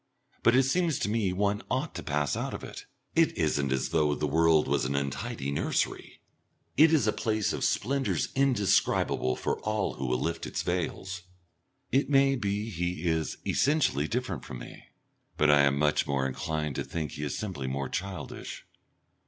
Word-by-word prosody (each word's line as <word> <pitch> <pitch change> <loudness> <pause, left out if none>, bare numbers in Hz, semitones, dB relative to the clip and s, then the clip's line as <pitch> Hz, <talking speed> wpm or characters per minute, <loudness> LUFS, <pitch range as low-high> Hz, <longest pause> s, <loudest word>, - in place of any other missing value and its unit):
But 115 - +5
it 130 - +6
seems 165 +3 +1
to - - -1
me 105 -4 +1
one 100 +2 0
ought - - -1
to - - -5
pass 75 -1 0
out - - -3
of - - -8
it. - - -9 0.3
It 165 -1 +3
isn't 75 -4 +1
as 65 0 0
though 75 -2 +2
the 75 - -1
world 80 +1 +3
was 70 -2 +1
an 70 +2 -1
untidy 70 0 -2
nursery; 70 - -2 0.5
it 155 +3 +6
is 155 -9 +4
a 110 - +2
place 110 -2 0
of - - -3
splendours 135 +3 0
indescribable 105 - +2
for - - -2
all 105 -1 -1
who 65 - -3
will 65 0 +1
lift 85 +4 -2
its - - -3
veils. 90 +2 -3 0.7
It 135 +3 +2
may 135 -1 +4
be 105 -1 -2
he 90 -1 -3
is 80 -2 0
essentially 140 - +2
different 110 - -3
from 65 - -7
me, - - -11 0.5
but 75 0 +5
I 75 -1 +6
am 70 0 +2
much 75 +1 +2
more 70 -1 0
inclined 75 +1 -2
to - - -1
think 80 -3 -4
he 75 - -6
is 75 - -2
simply 90 -11 -4
more 70 +1 -2
childish. 95 +5 -6
85 Hz, 180 wpm, -29 LUFS, 70-110 Hz, 0.7 s, it